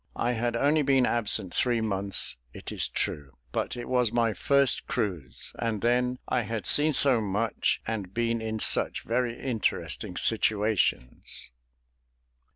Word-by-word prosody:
I 120 Hz, -, 0 dB
had 120 Hz, 0 st, -1 dB
only 145 Hz, +5 st, +2 dB
been 135 Hz, -2 st, +3 dB
absent 105 Hz, -6 st, 0 dB
three 120 Hz, -2 st, +1 dB
months, 100 Hz, -, +1 dB, 0.2 s
it -, -, -8 dB
is -, -, +1 dB
true; 70 Hz, -2 st, -3 dB, 0.2 s
but -, -, -3 dB
it 120 Hz, -, -6 dB
was 125 Hz, -3 st, +1 dB
my 115 Hz, -2 st, +1 dB
first 140 Hz, +1 st, +2 dB
cruise, 95 Hz, -, -3 dB
and 115 Hz, -3 st, -2 dB
then 125 Hz, +1 st, +1 dB
"I 125 Hz, -, +1 dB
had 110 Hz, -3 st, -4 dB
seen 150 Hz, -, +3 dB
so 130 Hz, -5 st, +4 dB
much, 105 Hz, +2 st, -1 dB
and 105 Hz, -5 st, -4 dB
been 115 Hz, +1 st, -1 dB
in 110 Hz, 0 st, -3 dB
such -, -, +1 dB
very 120 Hz, 0 st, -1 dB
interesting 120 Hz, -5 st, -2 dB
situations." 105 Hz, -, 0 dB
115 Hz, 145 wpm, -27 LUFS, 105-125 Hz, 0.2 s, so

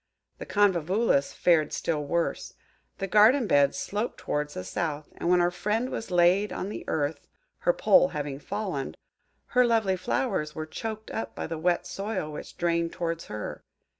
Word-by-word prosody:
The -, -, -7 dB
Convolvulus 190 Hz, -5 st, +2 dB
fared 165 Hz, -4 st, +3 dB
still 155 Hz, -3 st, -1 dB
worse. 170 Hz, +4 st, -2 dB, 0.4 s
The 195 Hz, -, -2 dB
garden 215 Hz, +7 st, +5 dB
beds 140 Hz, -6 st, +3 dB
sloped 210 Hz, +9 st, -3 dB
towards 150 Hz, 0 st, -3 dB
the 90 Hz, -, -4 dB
south; 155 Hz, -, -3 dB
and 170 Hz, -, -2 dB
when 180 Hz, 0 st, +5 dB
our 175 Hz, 0 st, +2 dB
friend 210 Hz, +8 st, -1 dB
was 225 Hz, -, -4 dB
laid 180 Hz, +3 st, +4 dB
on 190 Hz, -, -4 dB
the -, -, -6 dB
earth–her 160 Hz, -, -2 dB
pole 390 Hz, -, +5 dB
having 145 Hz, -4 st, -4 dB
fallen–her 200 Hz, -, -3 dB
lovely 225 Hz, -5 st, +2 dB
flowers 185 Hz, -4 st, -1 dB
were 155 Hz, -, -4 dB
choked 220 Hz, +6 st, -6 dB
up 225 Hz, -, -4 dB
by -, -, -4 dB
the 165 Hz, -1 st, -4 dB
wet 175 Hz, +1 st, +1 dB
soil 195 Hz, -6 st, -3 dB
which 150 Hz, -, -9 dB
drained 170 Hz, -1 st, 0 dB
towards 165 Hz, -1 st, -3 dB
her. 105 Hz, 0 st, -6 dB
175 Hz, 160 wpm, -27 LUFS, 155-210 Hz, 0.4 s, garden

